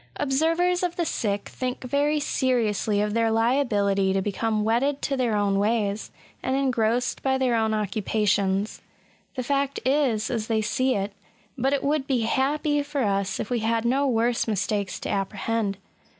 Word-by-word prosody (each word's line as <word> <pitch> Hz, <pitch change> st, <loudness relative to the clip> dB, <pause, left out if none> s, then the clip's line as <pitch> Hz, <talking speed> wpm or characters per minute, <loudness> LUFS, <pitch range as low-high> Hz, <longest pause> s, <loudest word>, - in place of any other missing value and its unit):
Observers 330 Hz, +6 st, +1 dB
of 355 Hz, -1 st, -1 dB
the 345 Hz, -, -1 dB
sick 205 Hz, -8 st, -2 dB
think 255 Hz, 0 st, -4 dB
very 285 Hz, +4 st, +1 dB
seriously 225 Hz, -7 st, +1 dB
of 210 Hz, 0 st, -1 dB
their 230 Hz, 0 st, +2 dB
liability 215 Hz, -5 st, +2 dB
to 195 Hz, -, +1 dB
become 210 Hz, +2 st, -1 dB
wedded 255 Hz, +6 st, +1 dB
to 275 Hz, -, 0 dB
their 245 Hz, -4 st, 0 dB
own 200 Hz, -1 st, +1 dB
ways, 210 Hz, -1 st, 0 dB, 0.3 s
and 260 Hz, -, -1 dB
engrossed 250 Hz, -2 st, 0 dB
by 265 Hz, -1 st, +1 dB
their 260 Hz, -2 st, +1 dB
own 220 Hz, -1 st, +1 dB
occupations. 205 Hz, -1 st, 0 dB, 0.5 s
The 255 Hz, -, -2 dB
fact 280 Hz, +1 st, 0 dB
is 260 Hz, -6 st, +1 dB
as 225 Hz, -3 st, -2 dB
they 220 Hz, -1 st, +1 dB
see 255 Hz, +4 st, +1 dB
it; 200 Hz, 0 st, -2 dB, 0.4 s
but 265 Hz, +1 st, 0 dB
it 280 Hz, -, 0 dB
would 285 Hz, -1 st, 0 dB
be 255 Hz, -4 st, +1 dB
happy 290 Hz, +5 st, +1 dB
for 285 Hz, -1 st, -2 dB
us 195 Hz, -2 st, 0 dB
if 215 Hz, -, -4 dB
we 245 Hz, -, +1 dB
had 225 Hz, +1 st, 0 dB
no 270 Hz, +4 st, +2 dB
worse 235 Hz, -1 st, +1 dB
mistakes 200 Hz, -1 st, -1 dB
to -, -, -4 dB
apprehend. 200 Hz, +1 st, -1 dB
230 Hz, 165 wpm, -25 LUFS, 210-270 Hz, 0.5 s, their